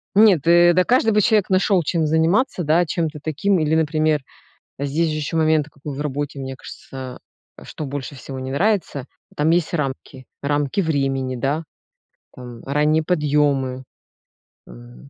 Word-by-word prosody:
Нет, 195 -8 +5
э, 175 0 +6
да 185 - +4
каждый 240 -1 +3
бы 210 - +3
человек 210 -1 +2
нашел 185 -1 +3
чем 160 0 0
заниматься, 165 - +1
да. 165 +4 +3
Чем-то 155 -2 -2
таким 180 +6 0
или, 155 0 +1
например, 155 -1 +1 0.6
здесь 145 +4 0
же 155 - -2
еще 155 +1 -3
момент, 155 -2 +2
какой 145 -1 -8
в 145 - -4
работе, 145 0 -3
мне 135 0 -5
кажется, 130 -1 -9 0.4
э, - - -12
что 155 - -7
больше 140 0 -6
всего 135 +1 -8
не 130 0 -5
нравится- 175 - 0 0.3
там 150 +2 +1
есть 170 -1 +1
рамки, 135 -3 -4 0.2
рамки 145 +5 0
времени, 135 -5 -1
да, 140 +6 -1 0.7
там 120 -2 -11
ранние 150 +3 +1
подъемы. 145 -5 +1 0.8
М, - - -14
150 Hz, 155 wpm, -21 LUFS, 135-170 Hz, 0.8 s, э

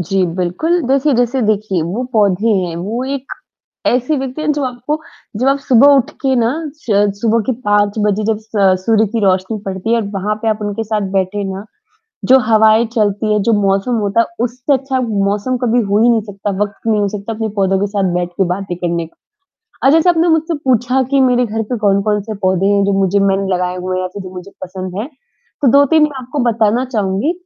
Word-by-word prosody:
जी, 185 +2 0
बिल्कुल 190 - 0
जैसे 275 +2 +2
जैसे 245 +2 +1
देखिए 210 -4 0
वो 185 +9 -3
पौधे 205 -1 +2
हैं 175 -3 -3
वो 210 +8 -3
एक 270 -2 -5 0.6
ऐसी 250 +5 +1
व्यक्ति 265 +2 -4
हैं 305 0 +1
जो 290 -1 -2
आपको 255 +5 -3 0.4
जब 255 +4 0
आप 275 +1 +3
सुबह 275 +1 +5
उठ 270 - +1
के 265 -1 +1
ना 230 -2 +2 0.3
श 205 -8 +1
सुबह 230 0 +2
की - - 0 0.2
5 205 0 +2
बजे 210 +1 0
जब 220 0 0
स 220 - -28 0.4
सूर्य 220 -1 +3
की 230 - -1
रोशनी 190 +3 +1
पड़ती 190 +2 -4
है। - - +4
और 205 - -5
वहाँ 200 +2 -1
पे 225 - -2
आप 215 0 -1
उनके 205 +2 -3
साथ 215 -1 -2
बैठे 195 +1 -1
ना, 195 +1 -7 0.6
जो 265 +1 +6
हवाएँ 220 +1 +4
चलती 210 0 0
हैं, 210 - +1
जो 230 +3 +2
मौसम 195 +5 +1
होता 200 +2 0
है। - - 0 0.2
उससे 250 +4 -1
अच्छा 265 0 -1
मौसम 205 +3 -1
कभी 245 0 +2
हो 200 +2 +1
ही 240 - +5
नहीं 230 -2 +3
सकता, 205 -1 -5
वक़्त 205 0 -7
नहीं 215 -2 +2
हो 205 - +1
सकता 210 +2 -5
अपने 220 0 -3
पौधों 195 -1 +2
के 205 - 0
साथ 195 -3 -1
बैठ 175 0 -1
के 195 - +2
बातें 190 -1 -5
करने 170 -1 -2
का। 160 - -20 0.7
अच्छा 290 +4 +6
जैसे 335 +2 +3
आपने 340 0 +2
मुझसे 320 0 +1
पूछा 250 +1 +2
कि 275 - +3
मेरे 250 -1 +3
घर 220 0 -3
पे 245 - 0
कौन-कौन 205 0 +1
से 220 +1 -5
पौधे 185 0 +1
हैं 200 0 +3
जो 200 - +1
मुझे 195 +1 +2
मैंने 195 0 +1
लगाए 180 0 -1
हुए 185 0 -3
है - - -1
या 185 - -2
जो 185 -1 -9
मुझे 185 +2 -9
पसंद 185 0 -6
हैं? 225 - -4 0.5
तो 280 - +3
2-3 285 +3 +5
मैं 295 -3 -1
आपको 255 +4 -5
बताना 230 +2 +1
चाहूँगी। 210 - -1
215 Hz, 220 wpm, -16 LUFS, 195-250 Hz, 0.7 s, जो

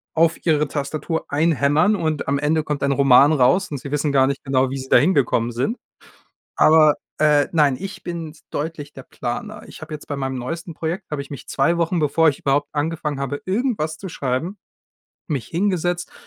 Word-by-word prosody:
auf 165 +1 +2
ihre 150 -2 +2
Tastatur 155 +3 -3
einhämmern 155 +5 +2
und 155 -5 -2
am 140 0 +1
Ende 150 +2 +1
kommt 150 -2 -3
ein 140 - +2
Roman 140 +1 +5
raus 155 +8 +3
und 145 - -4
sie 140 +1 -8
wissen 150 0 0
gar 135 -1 +4
nicht 140 0 -3
genau, 135 -1 +1
wie 135 - -4
sie 130 0 -7
dahin 155 +10 +4
gekommen 120 -3 +1
sind. 130 - -1 0.8
Aber, 155 -1 +5 0.2
äh 150 -2 +3
nein, 145 -4 +3
ich 195 +1 -7
bin 165 -3 -6 0.2
deutlich 150 -1 -5
der 135 - -9
Planer. 210 - -6
Ich - - -12
habe 155 - -10
jetzt 150 - -11
bei 145 - -3
meinem 135 -1 -3
neuesten 165 +6 -6
Projekt 170 +5 -4
habe 145 -2 -3
ich 140 - -16
mich 140 - -8
2 165 +5 +1
Wochen, 170 +2 0
bevor 160 +2 +3
ich 140 - -4
überhaupt 145 +1 0
angefangen 150 -1 -2
habe, 140 +1 -3
irgendwas 190 - -1
zu 190 +1 -7
schreiben 150 +7 -3 0.7
mich 140 -7 -3
hingesetzt 180 -1 -1
150 Hz, 190 wpm, -21 LUFS, 140-165 Hz, 0.8 s, Roman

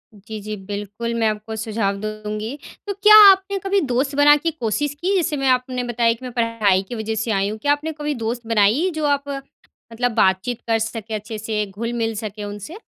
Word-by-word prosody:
जी, 215 +2 -8
जी। 215 +1 -5
बिल्कुल, 205 +3 -4
मैं 225 -1 +1
आपको 215 +1 -3
सुझाव 215 -2 -1
दूँगी। 215 +4 -5 0.3
तो 400 - -1
क्या 420 +2 +6 0.2
आपने 385 +1 0
कभी 390 +1 +1
दोस्त 270 +3 0
बना 290 0 +7
की 330 +3 -1
कोशिश 290 +1 -2
की, 390 +3 +1
जैसे 315 -5 0
मैं 270 - -1
आपने 255 0 0
बताया 235 -1 +1
कि 230 - -14
मैं 250 - -6
पढ़ाई 230 -5 +2
की 240 - -4
वजह 220 0 -3
से 225 +1 -2
आई 195 0 +1
हूँ। 215 - -5
क्या 285 +5 +1
आपने 305 +2 -1
कभी 295 0 -1
दोस्त 230 0 -4
बनाई, 230 - +3
जो 310 -1 -1
आप 285 -1 +1
मतलब 245 -3 -6
बातचीत 195 +4 +1
कर 225 -1 +2
सके, 225 0 -4
अच्छे 215 +1 -5
से 215 -1 -2
घुल-मिल 225 +1 -3
सके 210 -1 -6
उनसे? 205 - -7
230 Hz, 205 wpm, -21 LUFS, 215-280 Hz, 0.3 s, बना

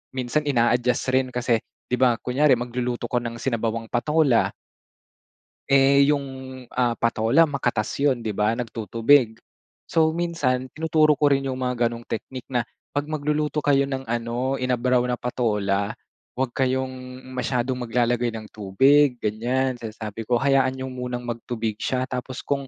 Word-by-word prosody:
minsan 130 +4 -1
ina-adjust 120 -1 +2
rin 130 0 +2
kasi, 120 -1 +1 0.3
'di 125 - +1
ba 125 -2 +4
kunyari 135 +5 +3
magluluto 120 0 -3
ko 125 - 0
ng 120 -1 -5
sinabawang 115 -2 -2
patola. 140 +1 +2 1.2
Eh, 140 0 +6
yung, 140 -1 -1 0.5
ah, 125 -1 +2
patola 115 +7 +3
makatas 120 -6 -1
'yon 140 -3 +2
'di 110 -3 -4
ba, 105 +2 +2
nagtutubig, 115 +1 +2 0.5
so 160 -1 +3
minsan 160 -7 -1
tinuturo 155 -1 +3
ko 145 0 +2
rin 135 0 +1
yung 130 - -2
mga 125 -2 +1
ganong 115 0 -7
teknik 125 +2 -6
na, 120 -2 0 0.2
"Pag 145 +1 -2
magluluto 150 0 -1
kayo 140 -1 +3
ng 135 -1 -3
ano, 120 +3 -2
inabraw 125 0 +1
na 125 - 0
patola, 105 -5 -1 0.4
'wag 130 -1 -1
kayong 130 0 -2
masyadong 125 0 -1
maglalagay 120 0 0
ng 110 -1 -8
tubig," 135 +7 +3
ganyan 120 +4 -1
sinasabi 110 -1 -7
ko, 125 - +2
"Hayaan 135 0 +2
niyo 130 0 -5
munang 125 -1 -4
magtubig 115 -2 -4
siya, 130 -1 -1
tapos 125 0 -5
kung 140 -1 -2
125 Hz, 145 wpm, -24 LUFS, 120-135 Hz, 1.2 s, Eh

